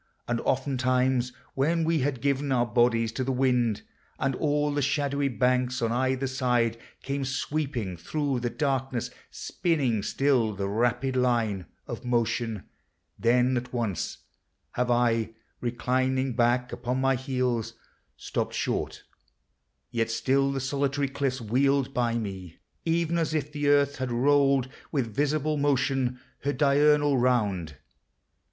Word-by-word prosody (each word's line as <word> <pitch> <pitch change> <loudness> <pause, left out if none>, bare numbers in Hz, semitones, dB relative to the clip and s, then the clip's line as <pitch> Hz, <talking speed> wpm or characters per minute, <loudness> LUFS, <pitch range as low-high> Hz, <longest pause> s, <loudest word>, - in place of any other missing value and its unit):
And 120 -1 -1
oftentimes, 130 -1 +1 0.2
When 160 +5 +1
we 165 0 +2
had 135 -2 -1
given 140 0 0
our 120 -2 +3
bodies 115 -1 +2
to 130 - -2
the 135 - -1
wind, 125 -4 +1 0.3
And 135 -1 0
all 150 0 +1
the 145 - 0
shadowy 140 0 0
banks 125 0 +1
on 115 -1 0
either 130 +2 0
side 125 -3 0 0.2
Came 140 0 -2
sweeping 135 - -2
thro' 140 - -2
the 120 0 -1
darkness, 135 -3 -1 0.2
spinning 140 - -1
still 125 -4 +1
The 100 0 -2
rapid 120 +5 0
line 115 -7 +1 0.2
of - - -6
motion, 120 -3 -1 0.6
then 125 +2 +3
at 125 0 -3
once 115 -7 -2 0.5
Have 125 0 -1
I, 115 -2 +1 0.2
reclining 130 +2 0
back 120 +1 +2
upon 125 +1 -2
my 135 0 +3
heels, 125 -3 -1 0.4
Stopped - - -3
short; - - -2 0.9
yet 115 -2 0
still 135 +4 +1
the 135 - -2
solitary 140 +1 -1
cliffs 135 -1 -1
Wheeled 135 +4 +1
by 120 -1 +1
me, 95 -6 -6
— - - -45
even 170 0 +1
as 160 -1 -1
if 150 -1 -2
the 145 -1 -2
Earth 140 -1 +3
had 130 -1 -3
rolled 135 +1 +3 0.2
With 125 -8 -1
visible 150 +1 +1
motion 135 -3 +1 0.2
her 145 +1 -1
diurnal 145 -1 +4
round! 100 - +1
130 Hz, 135 wpm, -27 LUFS, 120-140 Hz, 0.9 s, diurnal